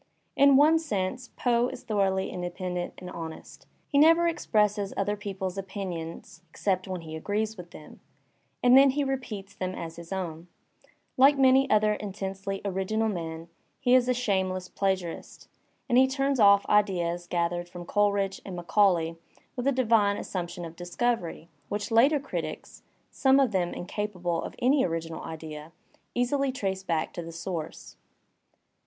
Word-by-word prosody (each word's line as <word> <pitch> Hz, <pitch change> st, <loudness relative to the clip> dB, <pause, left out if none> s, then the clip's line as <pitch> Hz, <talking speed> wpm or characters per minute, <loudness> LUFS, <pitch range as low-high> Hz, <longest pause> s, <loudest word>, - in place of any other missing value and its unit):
In 280 Hz, 0 st, +6 dB
one 310 Hz, +3 st, +6 dB
sense 250 Hz, -, -3 dB
Poe 240 Hz, -1 st, +2 dB
is -, -, -8 dB
thoroughly 195 Hz, -3 st, 0 dB
independent 180 Hz, 0 st, -4 dB
and 185 Hz, -, -9 dB
honest. 160 Hz, -1 st, -9 dB, 0.2 s
He 280 Hz, -, +2 dB
never 330 Hz, +3 st, +6 dB
expresses 210 Hz, -10 st, 0 dB
other 205 Hz, +1 st, 0 dB
people*s 195 Hz, -2 st, -5 dB
opinions 180 Hz, -3 st, -6 dB
except 185 Hz, +2 st, -1 dB
when 185 Hz, -2 st, -4 dB
he 160 Hz, -1 st, -8 dB
agrees 210 Hz, +6 st, -2 dB
with 180 Hz, -3 st, -10 dB
them, 155 Hz, -, -13 dB, 0.6 s
and 250 Hz, 0 st, +7 dB
then 275 Hz, +1 st, +8 dB
he 285 Hz, +2 st, 0 dB
repeats 245 Hz, -8 st, -4 dB
them 185 Hz, 0 st, -4 dB
as 165 Hz, 0 st, -7 dB
his 170 Hz, +1 st, -11 dB
own; 175 Hz, -3 st, -4 dB, 0.7 s
like 275 Hz, +2 st, +6 dB
many 265 Hz, 0 st, +5 dB
other 215 Hz, 0 st, +4 dB
in 205 Hz, -2 st, -5 dB
tensely 195 Hz, 0 st, -4 dB
original 200 Hz, +3 st, 0 dB
men 165 Hz, -3 st, -5 dB, 0.3 s
he 250 Hz, 0 st, +2 dB
is 255 Hz, -1 st, +5 dB
a -, -, +4 dB
shameless 190 Hz, -6 st, -1 dB
plagiarist, 190 Hz, -4 st, -3 dB, 0.4 s
and 240 Hz, -, +4 dB
he 265 Hz, -, +6 dB
turns 275 Hz, 0 st, 0 dB
off 200 Hz, -1 st, +6 dB
ideas 175 Hz, -4 st, +1 dB
gathered 175 Hz, 0 st, -1 dB
from 175 Hz, 0 st, -9 dB
Coleridge 200 Hz, 0 st, +1 dB
and 190 Hz, -, -7 dB
Macaulay 175 Hz, -2 st, +2 dB, 0.4 s
with 250 Hz, +1 st, -2 dB
a -, -, +5 dB
divine 225 Hz, -6 st, +3 dB
assumption 175 Hz, -1 st, -5 dB
of 165 Hz, 0 st, -9 dB
discovery, 175 Hz, -1 st, -2 dB, 0.2 s
which 205 Hz, +2 st, -3 dB
later 270 Hz, +7 st, +5 dB
critics 275 Hz, -, -6 dB, 0.3 s
(some 265 Hz, 0 st, +4 dB
of 265 Hz, -4 st, +3 dB
them 180 Hz, -3 st, 0 dB
incapable 180 Hz, -3 st, -3 dB
of -, -, -7 dB
any 265 Hz, +3 st, +3 dB
original 165 Hz, -1 st, -3 dB
idea) 155 Hz, -1 st, -8 dB, 0.4 s
easily 265 Hz, +3 st, +1 dB
trace 195 Hz, -7 st, -3 dB
back 165 Hz, -4 st, -2 dB
to -, -, -5 dB
the 165 Hz, 0 st, -8 dB
source. 165 Hz, -1 st, -6 dB
195 Hz, 155 wpm, -27 LUFS, 175-240 Hz, 0.7 s, then